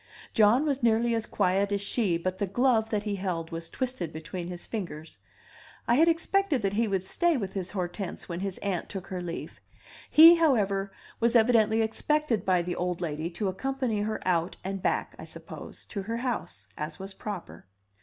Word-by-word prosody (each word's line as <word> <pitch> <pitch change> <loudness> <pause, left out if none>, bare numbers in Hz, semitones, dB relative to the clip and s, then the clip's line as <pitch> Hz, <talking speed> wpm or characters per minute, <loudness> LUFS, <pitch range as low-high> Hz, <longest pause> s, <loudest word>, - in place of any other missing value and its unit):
John 225 +6 +5
was 280 -2 0
nearly 235 0 +3
as 225 -1 -1
quiet 195 +1 +1
as 200 - +1
she, 200 -3 0
but 185 +2 -3
the 200 - 0
glove 225 +1 +2
that 210 -2 -1
he 205 -2 -2
held 175 -4 -3
was 165 0 -5
twisted 250 - -3
between 170 +3 -6
his 175 -1 -6
fingers. 170 -8 -6 0.7
I 240 +6 +4
expected 330 - +2
that 195 0 0
he 225 +2 +2
would 195 -3 0
stay 340 - +1
with 195 -5 -4
his 185 -2 -3
Hortense 185 0 -4
when 170 -1 -4
his 195 -1 -3
aunt 195 -4 -2
took 190 -2 -5
her 185 -1 -5
leave; 170 -1 -6 0.5
he, 325 +2 +10
however, 200 -11 +2 0.3
was 235 +1 +2
evidently 225 -1 +4
expected 240 -1 0
by 180 -2 +3
the 175 0 -3
old 180 -1 -2
lady 160 -1 -3
to 180 +4 -3
accompany 245 +2 -1
her 215 +1 -2
out 170 -1 +1
and 195 0 -4
back, - - 0
I - - -7
suppose, - - -10
to 200 - -4
her 225 +4 -3
house, 225 - -4
as 150 +1 -5
was 195 +1 -7
proper. 195 - -7
200 Hz, 185 wpm, -28 LUFS, 180-235 Hz, 0.7 s, he